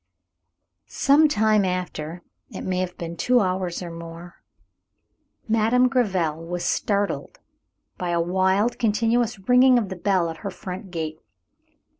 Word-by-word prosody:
Sometime 220 -8 +3
after, 175 -2 -4 0.3
it - - -7
may 185 -1 -2
have 185 -1 -3
been 170 0 -6
two 250 +8 +3
hours 185 -2 -1
or 170 - -6
more, 165 +1 -10 1.1
Madame 225 +3 +3
Gréville 180 - 0
was 175 0 -3
startled 205 - -1 0.6
by 180 - -2
a 170 0 +1
wild, 190 +6 +1
continuous 230 +1 +1
ringing 250 0 +6
of 215 -5 -1
the 190 - -5
bell 185 -1 +1
at 160 - -9
her 200 - -5
front 185 +1 -8
gate. 160 -2 -4
190 Hz, 130 wpm, -24 LUFS, 175-225 Hz, 1.1 s, ringing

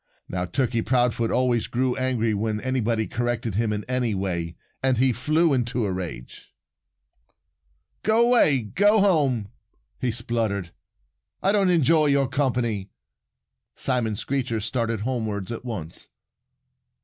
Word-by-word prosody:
Now, 90 0 -2
Turkey 115 +5 0
Proudfoot 120 -2 +1
always 125 -2 +1
grew 125 +1 0
angry 125 -4 0
when 105 +1 -1
anybody 120 -4 0
corrected 120 -1 -2
him 110 +2 0
in 105 0 -2
any 125 -4 0
way. 85 -3 -3 0.3
And 130 -2 +2
he 130 +1 +3
flew 155 +6 +2
into 120 -2 0
a 100 - -1
rage. 85 -10 -7 1.5
"Go 225 +2 +3
away! 195 - +4
Go 205 - +3
home!" 140 - +2 0.5
he 125 0 0
spluttered. 110 -6 -2 0.7
"I 195 - +4
don't 200 -2 +3
enjoy 160 -2 +4
your 140 -1 +3
company." 120 -7 -1 0.9
Simon 120 -5 0
Screecher 125 0 -2
started 115 0 -2
homewards 110 -5 -3
at 115 - -5
once. 95 -10 -7
120 Hz, 125 wpm, -24 LUFS, 110-130 Hz, 1.5 s, away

